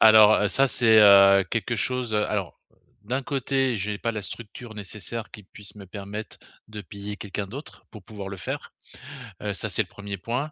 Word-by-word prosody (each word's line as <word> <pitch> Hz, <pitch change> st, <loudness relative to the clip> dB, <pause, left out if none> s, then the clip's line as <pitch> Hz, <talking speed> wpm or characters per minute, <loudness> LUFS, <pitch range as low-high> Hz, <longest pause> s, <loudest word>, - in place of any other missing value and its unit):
Alors, 110 Hz, -1 st, +8 dB
heu, 105 Hz, -, +2 dB
ça 135 Hz, +7 st, +3 dB
c'est, 115 Hz, -3 st, +6 dB
heu, 100 Hz, -1 st, +7 dB
quelque 115 Hz, +1 st, -1 dB
chose 125 Hz, 0 st, -1 dB
alors 105 Hz, -2 st, -1 dB, 0.5 s
d'un 130 Hz, +6 st, -2 dB
côté, 135 Hz, -2 st, 0 dB
j'ai 105 Hz, 0 st, -3 dB
pas 115 Hz, -, -2 dB
la 105 Hz, -, -4 dB
structure 115 Hz, +3 st, -8 dB
nécessaire 105 Hz, +2 st, -7 dB
qui 105 Hz, -, -11 dB
puisse 105 Hz, +2 st, -10 dB
me 100 Hz, -2 st, -11 dB
permettre 105 Hz, +2 st, -7 dB, 0.3 s
de 105 Hz, -1 st, -8 dB
payer 100 Hz, +1 st, -8 dB
quelqu'un 105 Hz, 0 st, -5 dB
d'autre 140 Hz, +7 st, -9 dB
pour 110 Hz, -, -12 dB
pouvoir 105 Hz, -3 st, -8 dB
le 100 Hz, -, -6 dB
faire, 90 Hz, -, -6 dB, 0.7 s
heu, 105 Hz, -1 st, -2 dB
ça 110 Hz, +2 st, -3 dB
c'est 105 Hz, -, +3 dB
le 95 Hz, -, -18 dB
1er 100 Hz, +1 st, -7 dB
point. 125 Hz, +10 st, -3 dB
105 Hz, 190 wpm, -25 LUFS, 100-115 Hz, 0.7 s, Alors